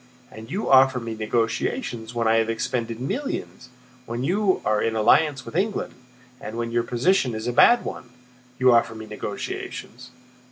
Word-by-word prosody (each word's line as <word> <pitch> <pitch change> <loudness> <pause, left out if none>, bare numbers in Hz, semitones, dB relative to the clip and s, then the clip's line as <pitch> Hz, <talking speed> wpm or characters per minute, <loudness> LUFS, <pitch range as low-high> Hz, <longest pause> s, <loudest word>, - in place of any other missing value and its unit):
And 110 +1 -11
you 200 +4 -3
offer 130 -1 +5
me 115 -1 -5
negotiations 115 - -2
when 115 -1 0
I 110 0 +4
have 115 0 +1
expended 115 0 -2
millions, 135 - -4 0.4
when 120 +2 -4
you 190 +5 +1
are 105 0 +2
in 115 0 0
alliance 135 +5 +3
with - - -9
England, 200 +4 -1 0.5
and 110 - -7
when 115 0 -3
your 120 0 +2
position 125 - +1
is 110 +1 -5
a 120 - -1
bad 240 - +5
one. 125 - -7 0.5
You 130 -1 +5
offer 115 -1 +2
me 110 0 -8
negotiations! 125 +2 -6
120 Hz, 165 wpm, -24 LUFS, 115-135 Hz, 0.5 s, offer